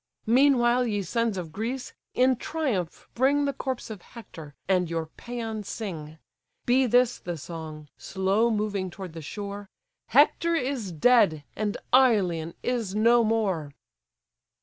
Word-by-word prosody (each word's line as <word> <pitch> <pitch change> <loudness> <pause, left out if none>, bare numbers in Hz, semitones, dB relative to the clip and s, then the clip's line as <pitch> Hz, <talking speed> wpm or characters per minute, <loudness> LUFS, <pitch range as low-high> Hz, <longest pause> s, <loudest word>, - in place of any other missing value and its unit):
Meanwhile, 245 0 +4
ye 205 -3 -1
sons 230 +3 -1
of 170 -3 -5
Greece, 235 +7 -4 0.2
in 255 +1 +4
triumph 255 - -3
bring 280 +4 +2
The 280 - -1
corpse 260 -4 -4
of 205 -4 -8
Hector, 160 -11 -12
and 180 -3 +2
your 165 -1 -3
pæans 225 -3 -5
sing. 160 -8 -6 0.5
Be 255 +1 +3
this 245 +1 +3
the 175 -1 -5
song, 155 -1 -8
slow 195 +4 +1
moving 205 -4 -1
toward 180 -1 -9
the 165 - -7
shore, 200 +4 -7 0.4
"Hector 310 +6 +4
is 255 - -2
dead, 175 -4 +4
and 210 -1 -2 0.2
Ilion 190 -11 +3
is 230 -6 -2
no 235 +2 +5
more."" 195 -10 0
215 Hz, 135 wpm, -26 LUFS, 180-245 Hz, 0.5 s, no